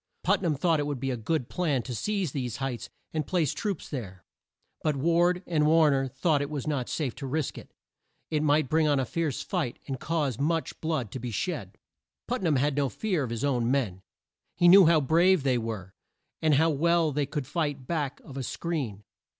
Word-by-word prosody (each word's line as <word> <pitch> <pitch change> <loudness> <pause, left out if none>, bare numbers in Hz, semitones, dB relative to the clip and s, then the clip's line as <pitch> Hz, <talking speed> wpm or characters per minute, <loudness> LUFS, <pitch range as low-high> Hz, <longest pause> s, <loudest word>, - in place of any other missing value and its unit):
Put - - +2
nam 165 -5 +1
thought 160 +2 +2
it 145 - -1
would 145 -3 -3
be 135 +2 -1
a - - -1
good 125 +3 -1
plan 150 -9 0
to 125 - -5
seize 195 - -1
these 125 -5 -3
heights 135 -3 -4 0.2
and 155 -3 -2
place 170 -7 +1
troops 205 -6 -3
there; 95 - -7 0.6
but 155 -2 +1
Ward 170 +5 +2
and 155 -3 +2
War 160 -1 +5
ner 135 -1 +1
thought 140 +3 +1
it 145 - -3
was 145 -4 -4
not 140 -5 -2
safe 140 -7 -2
to 135 - -5
risk 150 +1 -2
it. - - -11 0.6
It 155 -1 +1
might 150 -1 +3
bring 155 +2 +2
on 145 -2 +3
a 130 - 0
fierce 155 0 -2
fight 160 -11 -2
and 135 -2 -4
cause 150 -7 -1
much 165 +3 -1
blood 155 -10 -1
to 130 - -5
be 125 0 -4
shed. 115 - -3 0.5
Put - - -1
nam 165 -5 +2
had 140 +2 +1
no 140 -2 +1
fear 190 - -1
of 130 - -2
his 115 +1 -3
own 125 -4 +1
men. 115 -9 0 0.5
He 175 -1 +4
knew 185 0 +9
how 165 -2 +5
brave 170 +4 +4
they 130 -3 +2
were, 110 -5 -5 0.5
and 155 -2 +4
how 160 +3 +4
well 165 +2 +2
they 145 0 -1
could 145 -1 -3
fight 145 -2 -2
back 145 -3 -2
of 135 - -10
a - - -2
screen. 130 - -3
145 Hz, 215 wpm, -28 LUFS, 130-165 Hz, 0.6 s, knew